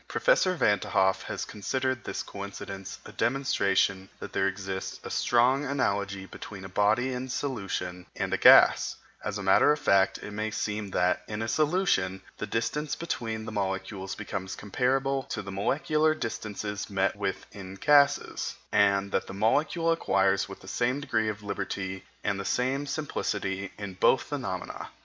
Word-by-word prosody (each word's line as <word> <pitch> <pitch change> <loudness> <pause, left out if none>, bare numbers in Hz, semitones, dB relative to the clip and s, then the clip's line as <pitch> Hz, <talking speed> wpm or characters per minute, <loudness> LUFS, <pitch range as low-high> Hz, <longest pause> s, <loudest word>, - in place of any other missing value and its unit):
Professor - - +3
Van 105 - +3
t'Hoff 95 0 +2
has - - -4
considered 130 +4 -2
this - - -4
coincidence 100 -1 -7
a - - -9
demonstration 100 -7 +1
that - - -8
there 95 - +2
exists 95 -1 -4
a - - -7
strong 125 +4 +3
analogy 100 -8 -1
between 95 0 -9
a - - -7
body 110 +7 +2
in 125 +1 -4
solution 100 -9 -3
and - - -2
a - - +2
gas; - - +7 0.3
as 105 -1 -3
a 105 - -5
matter 95 +9 +5
of 150 - +2
fact, 100 -9 +3
it - - -8
may 110 +1 -2
seem 105 -1 -3
that, 90 -1 +1
in 110 +1 -3
a - - -2
solution, 150 - +1 0.2
the 105 - -3
distance 135 +8 -1
between 115 -9 -3
the 115 - -5
molecules 95 -1 -3
becomes 95 -2 -5
comparable 135 +6 0
to 125 - -5
the 100 - -7
molecular 155 - +1
distances 105 -5 -4
met 95 -1 +1
with 100 -2 -3
in 95 -1 -9
gases, 140 +6 +3 0.2
and 100 -1 +3
that - - 0
the - - -7
molecule 150 - +2
acquires 95 -11 +2
the 95 - -15
same 125 +7 0
degree 110 -6 0
of 105 0 -6
liberty 95 -2 -4 0.2
and 100 -1 0
the - - -3
same 130 +6 0
simplicity 100 -10 -2
in 100 -2 -6
both 95 +7 +3
phenomena. 125 - -5
105 Hz, 160 wpm, -28 LUFS, 95-130 Hz, 0.3 s, gas